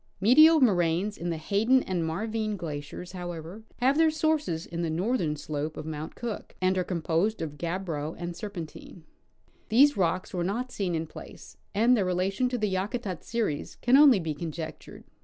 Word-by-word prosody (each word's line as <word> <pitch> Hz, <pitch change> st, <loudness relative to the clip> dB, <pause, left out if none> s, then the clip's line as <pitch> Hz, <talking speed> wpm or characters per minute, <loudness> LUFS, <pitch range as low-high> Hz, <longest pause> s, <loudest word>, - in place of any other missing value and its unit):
Medial 310 Hz, -, +7 dB
moraines 185 Hz, -2 st, +2 dB
on 175 Hz, -, -2 dB
the 165 Hz, -, -2 dB
Hayden 215 Hz, +10 st, +2 dB
and 180 Hz, -3 st, -2 dB
Marvine 215 Hz, +5 st, -2 dB
glaciers, 155 Hz, +1 st, -6 dB
however, 175 Hz, +1 st, -7 dB, 0.2 s
have 265 Hz, +5 st, +2 dB
their 325 Hz, -1 st, +6 dB
sources 310 Hz, -, 0 dB
on 170 Hz, -, -2 dB
the 170 Hz, -, -1 dB
northern 175 Hz, -1 st, 0 dB
slope 150 Hz, +1 st, -4 dB
of -, -, -6 dB
Mount 155 Hz, 0 st, -6 dB
Cook, 235 Hz, -3 st, -6 dB
and 185 Hz, +1 st, +2 dB
are 185 Hz, -, +1 dB
composed 175 Hz, +4 st, 0 dB
of 150 Hz, -2 st, -5 dB
gabbro 165 Hz, -3 st, -3 dB
and 175 Hz, 0 st, -5 dB
serpentine. 175 Hz, -3 st, -8 dB, 0.7 s
These 280 Hz, +6 st, +5 dB
rocks 185 Hz, 0 st, 0 dB
were 175 Hz, -2 st, -1 dB
not 235 Hz, +8 st, -2 dB
seen 185 Hz, -7 st, -2 dB
in 160 Hz, 0 st, -2 dB
place, -, -, -12 dB, 0.2 s
and 235 Hz, +4 st, +5 dB
their 210 Hz, -, +2 dB
relatio^i 190 Hz, +7 st, 0 dB
to 250 Hz, -, -2 dB
the 210 Hz, -4 st, -1 dB
Yakutat 195 Hz, -1 st, -3 dB
series 220 Hz, -11 st, -2 dB
can 245 Hz, +2 st, +3 dB
only 275 Hz, -6 st, +7 dB
be 160 Hz, -3 st, -2 dB
conjectured. 160 Hz, +1 st, -7 dB
185 Hz, 175 wpm, -28 LUFS, 165-225 Hz, 0.7 s, Medial